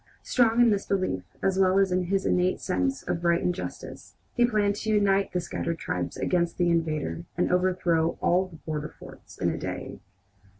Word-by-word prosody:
Strong 235 -2 +2
in 240 -2 +6
this 200 -1 -1
belief, 185 - 0 0.2
as 195 0 +1
well 190 0 +4
as 195 -1 +3
in 180 0 +1
his 195 +2 0
innate 180 +1 +2
sense 270 +8 -1
of 170 - -3
right 170 0 +2
and 180 - +1
justice, - - -8 0.2
he 245 - +2
planned 210 -3 +1
to 220 - -4
unite 200 -2 +2
the 180 - 0
scattered 170 -1 -3
tribes 90 - -3
against 175 -2 0
the 175 -1 +2
invader 165 0 -1
and 180 - +1
overthrow 180 -3 +1
all 185 +2 +2
the 175 - -14
border 155 -1 -5
forts - - -13
in - - 0
a - - -4
day. - - -5
180 Hz, 195 wpm, -27 LUFS, 170-195 Hz, 0.2 s, in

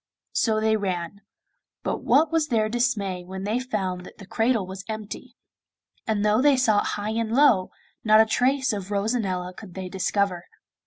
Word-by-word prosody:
So 220 -2 +2
they 220 0 +2
ran; 185 -1 -4 0.6
but - - -2
what 310 +2 +3
was 325 -2 +1
their 220 -5 +1
dismay 215 -6 -1
when 190 +1 -7
they 215 +4 0
found 190 -8 -3
that - - -13
the 200 - -11
cradle 225 0 +1
was 190 +1 -8
empty; 220 +3 -7 0.7
and 210 -2 0
though 210 +3 +3
they 285 -1 +5
sought 220 -5 +2
high 205 +1 -3
and 225 0 -2
low, 235 -8 +4 0.3
not 215 0 +6
a 220 - +7
trace 260 +3 +1
of 200 -2 -5
Rosanella 200 -4 -1
could 185 -1 -12
they 190 -1 -5
discover. 190 -1 -1
215 Hz, 170 wpm, -25 LUFS, 190-235 Hz, 0.7 s, a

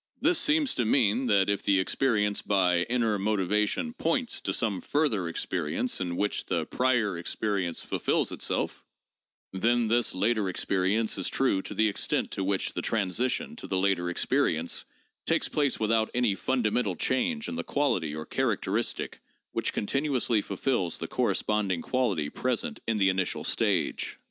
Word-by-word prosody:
This 355 -2 +3
seems 300 -2 +2
to 125 - 0
mean 115 +1 +2
that 100 -4 +4
if 100 -1 0
the 100 -2 +3
experience 105 0 +1
by 90 -3 +2
inner 115 -4 +1
motivation 105 - 0
'points' 255 0 -1
to - - -2
some 105 -5 0
further 130 - 0
experience 85 +6 -2
in 90 -2 -2
which 105 +3 -1
the 85 -3 0
prior 115 -7 +1
experience 90 -1 -2
fulfills - - 0
itself, - - -3 0.7
then 115 +4 +2
this 120 -2 +2
later 105 +1 +1
experience 95 +4 0
is 95 - -1
true 125 -8 +1
to - - -7
the 110 - +3
extent 100 - 0
to 95 - -2
which 95 0 -1
the - - -2
transition 115 - -1
to - - -7
the 95 - -1
later 95 -2 +1
experience 85 -1 0 0.4
takes - - +2
place 145 -4 0
without 110 0 +2
any 120 -4 +2
fundamental 110 -3 0
change 225 - 0
in - - -4
the 250 - -3
quality 90 - 0
or 80 0 -5
characteristic 115 -3 -1 0.3
which - - -1
continuously 130 -2 0
fulfills 100 - -1
the - - -5
corresponding 100 -5 0
quality 105 - 0
present 130 - -2
in 115 -1 +1
the 95 -2 +4
initial 95 -1 -1
stage. - - 0
105 Hz, 155 wpm, -28 LUFS, 95-125 Hz, 0.7 s, that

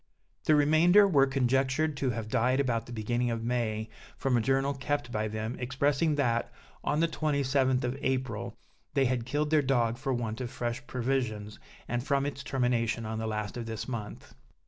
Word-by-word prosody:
The 155 - +5
remainder 165 +7 +6
were 140 -7 +4
conjectured 135 +3 +1
to 135 -1 0
have 115 -3 -3
died 125 +4 +2
about 120 -4 0
the - - -9
beginning 120 +2 -1
of 115 -1 -2
May, 115 -2 -1 0.3
from 135 -2 +1
a 120 - +3
journal 135 +3 +1
kept 140 -2 -2
by 110 -1 -1
them, 110 +2 -4
expressing 140 +4 +1
that, 120 -5 0 0.3
on 150 - +1
the 165 - +4
27th 140 -5 +1
of 125 +1 -1
April, 130 -5 -2 0.4
they 135 - +4
had 125 -2 -1
killed 150 +2 0
their 155 -1 +5
dog 120 -3 +1
for 135 0 -2
want 115 -2 -2
of 125 - -3
fresh 120 +1 -4
provisions, 115 -5 -2 0.3
and 120 0 -1
from 140 0 +1
its 145 -1 -4
termination 120 -4 0
on 110 0 -3
the 110 - -2
last 105 0 -3
of 115 -1 -5
this 110 -1 -5
month. 115 -5 -6
125 Hz, 185 wpm, -29 LUFS, 115-140 Hz, 0.4 s, remainder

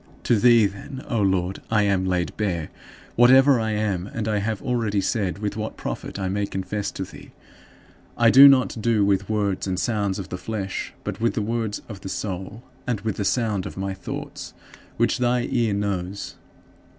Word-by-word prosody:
To 115 - +3
thee, 120 -1 +6
then, 100 +7 -6
O 115 -5 0
Lord, 95 -1 0
I 105 -2 +3
am 95 -2 +1
laid 90 -3 -1
bare, 90 -7 -2 0.4
whatever 130 +2 +6
I 110 -1 -1
am, 100 -4 -1
and 110 0 -4
I 105 -1 +1
have 105 0 -2
already 115 -4 -1
said 100 -2 -1
with 105 0 -3
what 110 0 -5
profit - - -5
I 95 -1 -2
may 100 +2 -1
confess 95 +2 -3
to - - -4
thee. - - -12 0.9
I 115 -1 +5
do 135 +3 +10
not 130 -4 +3
do 115 -1 +2
it - - +5
with 100 0 +1
words 100 -3 -1
and 95 -1 -1
sounds 105 -4 0
of 95 -2 -6
the 90 - -5
flesh 100 -4 -4
but - - -5
with 115 - +1
the 105 - 0
words 110 -1 -2
of 105 -4 -9
the 95 - -6
soul, 95 +4 -5 0.2
and 115 -5 -1
with 110 -1 -3
the 105 - -1
sound 105 -5 0
of - - -10
my 95 0 -2
thoughts, 95 - -7 0.4
which 120 +2 +1
thy 125 0 +2
ear 115 -3 +1
knows. 100 -1 -3
105 Hz, 195 wpm, -24 LUFS, 95-115 Hz, 0.9 s, do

